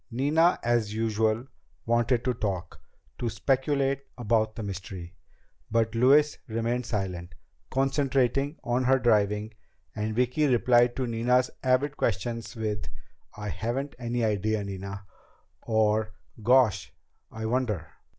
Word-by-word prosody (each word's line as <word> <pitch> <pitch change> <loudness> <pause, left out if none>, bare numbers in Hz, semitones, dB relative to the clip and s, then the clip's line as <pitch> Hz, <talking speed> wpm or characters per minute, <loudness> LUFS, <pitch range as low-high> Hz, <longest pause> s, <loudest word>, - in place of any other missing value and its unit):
Nina, 150 +8 +3
as 115 -3 +1
usual, 110 +1 +1 0.4
wanted 120 +1 +1
to 125 - +2
talk, 95 -6 -4 0.4
to 120 - -1
speculate 135 +4 0 0.2
about 110 -2 +1
the 110 - -5
mystery. 95 -3 -7 0.6
But 115 0 +1
Louise 140 +6 +4
remained 115 +2 -1
silent, 90 -6 -3 0.3
concentrating 135 +1 +1
on 125 +2 0
her 135 +1 +5
driving, 105 -3 +1 0.4
and 110 0 -2
Vicki 125 +5 +2
replied 120 -1 +4
to 130 - -1
Nina's 125 +2 +1
avid 135 +3 +1
questions 115 +3 -2
with 105 -2 -3 0.5
"I 105 0 -4
haven't 130 +7 -3
any 120 -1 -1
idea, 110 0 0
Nina!" 100 0 -6 0.6
or 110 -1 +1 0.3
"Gosh, 125 -2 +3 0.4
I 110 0 -5
wonder!" 110 -8 -1
115 Hz, 120 wpm, -27 LUFS, 105-130 Hz, 0.6 s, her